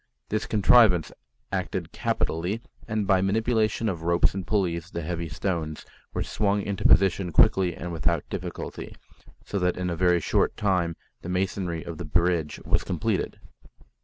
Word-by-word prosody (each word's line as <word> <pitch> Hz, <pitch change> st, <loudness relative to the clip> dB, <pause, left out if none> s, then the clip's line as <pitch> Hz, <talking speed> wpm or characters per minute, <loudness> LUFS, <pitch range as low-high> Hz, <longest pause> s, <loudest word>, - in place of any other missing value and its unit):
This 110 Hz, +1 st, -1 dB
contrivance 105 Hz, -5 st, +5 dB, 0.4 s
acted -, -, -3 dB
capitally, 90 Hz, +8 st, -1 dB, 0.2 s
and 110 Hz, -2 st, -1 dB
by 95 Hz, -1 st, +3 dB
manipulation 110 Hz, +2 st, +1 dB
of 90 Hz, -6 st, -2 dB
ropes 85 Hz, +1 st, +2 dB
and 95 Hz, -2 st, -5 dB
pulleys 85 Hz, -5 st, 0 dB
the 85 Hz, -, -5 dB
heavy 85 Hz, 0 st, -3 dB
stones 80 Hz, -2 st, -3 dB, 0.3 s
were -, -, -2 dB
swung 100 Hz, 0 st, 0 dB
into 100 Hz, -2 st, 0 dB
position 95 Hz, -1 st, +4 dB
quickly 90 Hz, +3 st, +4 dB
and 85 Hz, +1 st, -6 dB
without 85 Hz, -1 st, 0 dB
difficulty, -, -, -6 dB, 0.5 s
so 100 Hz, -, -2 dB
that 90 Hz, -1 st, +1 dB
in 90 Hz, -1 st, -2 dB
a -, -, -1 dB
very 90 Hz, 0 st, +3 dB
short -, -, +1 dB
time 90 Hz, -5 st, +1 dB, 0.3 s
the 85 Hz, -, -7 dB
masonry 90 Hz, -2 st, -1 dB
of 85 Hz, -2 st, -7 dB
the 90 Hz, -, -4 dB
bridge 85 Hz, 0 st, +1 dB
was -, -, +2 dB
completed. -, -, -2 dB
90 Hz, 155 wpm, -26 LUFS, 85-100 Hz, 0.5 s, contrivance